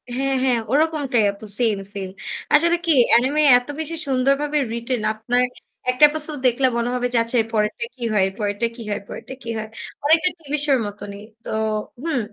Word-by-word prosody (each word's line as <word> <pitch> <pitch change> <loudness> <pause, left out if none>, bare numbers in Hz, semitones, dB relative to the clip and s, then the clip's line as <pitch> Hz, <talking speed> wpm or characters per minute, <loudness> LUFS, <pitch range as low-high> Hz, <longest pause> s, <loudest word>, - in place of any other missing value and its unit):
হ্যাঁ, 270 +1 0
হ্যাঁ, 250 -3 +2
ওরকমটাই 290 -6 +2
আপু 200 +2 -12
same, 215 -5 +1
same। 190 -2 -5 0.4
আসলে 335 +3 +5
কি 330 - +3 0.2
anime 270 +6 +3 0.2
এত 245 +2 -5
বেশি 320 +1 -3
সুন্দরভাবে 275 +3 +1
written, 235 +1 -2
আপনার 240 +3 0 0.5
১ 250 - +2
টা - - +5
episode 305 -1 -5
দেখলে 255 +2 +3
মনে 235 +1 0
হবে 245 0 0
যে - - +3
আচ্ছা 230 +2 -2
এর 220 - -5
পরেরটা 210 +1 0
কি 255 - -20
হয়, 200 -2 +3
এর 195 - -6
পরেরটা 205 +1 -1
কি 235 - -10
হয়, 205 - -2
পরেরটা - - -8
কি 230 - -7
হয়? 220 0 -4 0.4
অনেকটা 320 +4 +4
TV 295 -2 -9
show 285 - +3
র - - -2
মতনই। 205 0 -8 0.2
তো, - - -8 0.5
হুম। 320 -6 0
250 Hz, 195 wpm, -22 LUFS, 220-295 Hz, 0.5 s, আসলে